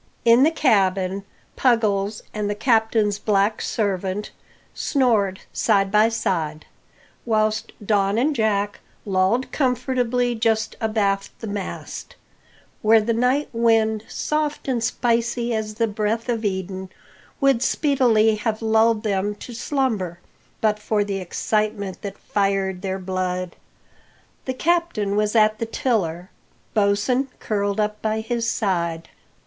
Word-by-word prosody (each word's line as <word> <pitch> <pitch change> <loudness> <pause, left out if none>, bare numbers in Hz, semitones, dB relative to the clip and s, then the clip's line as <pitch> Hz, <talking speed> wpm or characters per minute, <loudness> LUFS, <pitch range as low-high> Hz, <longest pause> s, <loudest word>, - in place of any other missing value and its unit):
In 235 +2 +6
the 295 - +6
cabin 195 - +1 0.3
Puggles 210 -4 +1
and 210 -1 -2
the 205 - -1
captain's 220 -3 +2
Black 205 +1 +1
servant 195 -1 -2 0.4
snored 220 -9 +1
side 195 -3 +2
by 215 +2 +5
side; 160 -8 -2 0.6
whilst 215 -1 0
Don 200 0 +2
and 285 +5 +2
Jack 205 -3 0 0.3
lolled 195 +6 +1
comfortably 250 -2 0
just 220 -1 0
abaft 200 -3 -1
the - - -6
mast, 200 -2 -6 0.7
where 220 +1 +6
the 225 +2 0
night 250 +5 +1
wind, 225 -2 +2
soft 300 -1 -2
and 245 -4 0
spicy 235 0 0
as 215 -1 -3
the 230 - +2
breath 215 +3 -2
of 230 -2 -1
Eden, 190 -1 -3 0.5
would 275 -4 +3
speedily 240 -8 +3
have 215 +1 -2
lulled 220 0 +3
them 205 -1 0
to 240 +4 -10
slumber 225 - -1 0.4
but 210 -1 +2
for 210 0 0
the 200 -1 -3
excitement 200 +1 -2
that 200 -1 -6
fired 195 -2 -1
their 190 -1 -2
blood. 185 -1 -3 0.9
The 260 - -3
Captain 335 -11 0
was 210 +1 +1
at 215 -1 +4
the 230 - -2
tiller, 185 -8 -1 0.4
Bosin 215 +6 +2
curled 205 -1 -1
up 210 0 -1
by 220 0 -1
his 230 0 -1
side. 170 -6 -1
215 Hz, 125 wpm, -22 LUFS, 200-230 Hz, 0.9 s, In